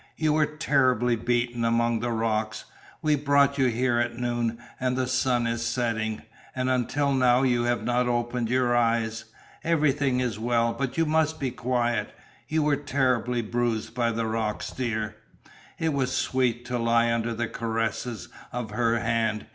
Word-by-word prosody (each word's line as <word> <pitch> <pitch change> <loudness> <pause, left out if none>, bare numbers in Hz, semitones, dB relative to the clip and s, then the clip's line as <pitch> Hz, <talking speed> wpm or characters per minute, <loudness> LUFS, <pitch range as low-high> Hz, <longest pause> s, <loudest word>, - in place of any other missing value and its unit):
You 155 -1 +2
were 155 -1 +3
terribly 130 -6 +2
beaten 120 +1 -1
among 115 0 +2
the 120 +2 -2
rocks. 110 -1 -1 0.4
We 155 -1 +3
brought 140 -1 +3
you 130 - +4
here 120 0 +1
at 120 0 -1
noon, 120 -1 -1 0.2
and 125 0 0
the 130 - +1
sun 125 -1 +1
is 115 0 -1
setting 115 -2 -1 0.3
and 130 0 0
until 140 +3 +1
now 125 -1 +4
you 120 -2 +2
have 120 -2 0
not 120 +1 +1
opened 120 -1 -1
your 125 -1 +2
eyes. 115 -1 +1 0.4
Everything 145 -5 +2
is 120 -5 -2
well. 115 0 +1
But 140 0 -3
you 165 - +3
must 160 0 +1
be 135 -3 -1
quiet. 120 -1 -1 0.3
You 155 0 +1
were 145 -1 +2
terribly 125 -4 0
bruised 115 0 -1
by 120 -1 +1
the 115 0 -2
rocks, 110 -1 -2
dear." 110 -4 -3 0.6
It 160 -2 0
was 130 -2 0
sweet 125 -2 0
to 125 0 -2
lie 115 0 +3
under 115 0 -1
the 115 +1 -1
caresses 115 -2 -3 0.2
of 120 -3 -4
her 115 +1 +1
hand. 115 -1 0
120 Hz, 165 wpm, -26 LUFS, 115-130 Hz, 0.6 s, you